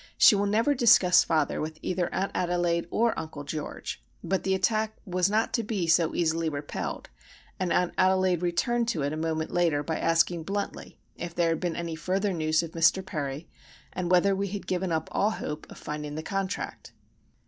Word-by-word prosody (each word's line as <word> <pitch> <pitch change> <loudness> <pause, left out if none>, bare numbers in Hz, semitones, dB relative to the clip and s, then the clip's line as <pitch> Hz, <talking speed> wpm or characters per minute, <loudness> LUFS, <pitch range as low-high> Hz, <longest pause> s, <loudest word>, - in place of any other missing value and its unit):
She - - +8
will 205 0 +1
never 225 +8 +2
discuss 230 -8 +6
father 155 -3 0
with 155 +1 -5
either 180 -1 -1
Aunt 195 +1 -1
Adelaide 175 -1 0
or 230 +4 +2
Uncle 155 -2 -7
George;—but 155 - -5
the 190 0 +1
attack 215 +3 0
was 180 -1 +1
not 220 +3 +1
to 235 - +2
be 210 -5 -2
so 165 0 +3
easily 165 -1 +1
repelled, 145 -1 -5 0.5
and 185 -2 -1
Aunt 180 0 +1
Adelaide 185 -2 +3
returned 230 +7 0
to 165 -11 -1
it 145 +2 -1
a - - -2
moment 160 0 -2
later 165 -5 +2
by 160 +1 -2
asking 165 +1 +2
bluntly 200 +4 -5 0.2
if 170 0 -6
there 170 -1 +2
had 165 - 0
been 175 -2 -2
any 170 -1 -4
further 190 +5 -1
news 155 -1 +1
of 165 - -6
Mr. 170 +3 +3
Perry, 150 -2 -4 0.5
and 180 -1 -3
whether 185 +2 +4
we 200 +1 -1
had 200 +1 -5
given 185 -1 -1
up 160 -1 -1
all 205 - +2
hope 150 -8 -5
of - - -11
finding 150 0 -5
the 155 - -4
contract. 195 +2 -4
175 Hz, 190 wpm, -27 LUFS, 160-195 Hz, 0.5 s, She